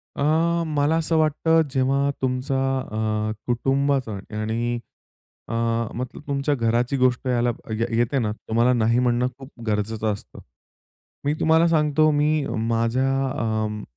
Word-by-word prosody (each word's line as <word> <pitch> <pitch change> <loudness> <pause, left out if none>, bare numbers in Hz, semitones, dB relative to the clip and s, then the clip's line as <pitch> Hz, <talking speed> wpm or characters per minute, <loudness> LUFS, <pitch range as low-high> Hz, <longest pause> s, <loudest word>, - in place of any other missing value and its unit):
अ, - - -5 0.5
मला 150 +1 +1
असं 165 0 0
वाटतं 160 +1 +3
जेव्हा 135 +1 +1
तुमचा 130 +1 -1 0.4
अ, 110 0 -1 0.2
कुटुंबाचा 135 0 +1 0.3
आणि 115 +2 -1 0.7
अ, - - -5 0.4
मतलब 125 +4 -5
तुमच्या 140 +1 0
घराची 120 +3 +1
गोष्ट 125 0 +1
याला 120 -1 +2 0.3
य 115 - +2
येते 120 +3 +1
ना, 105 -3 0
तुम्हाला 115 +3 +1
नाही 115 +1 +2
म्हणणं 125 0 +2
खूप 135 0 -11 0.2
गरजेचं 110 +1 -1
असतं. 100 - -11 0.9
मी 145 - +2
तुम्हाला 160 +1 +4
सांगतो, 155 -1 +3
मी 150 0 +1 0.2
माझ्या 115 +3 +1 0.3
अं, 110 -2 -2
125 Hz, 130 wpm, -23 LUFS, 115-145 Hz, 0.9 s, तुम्हाला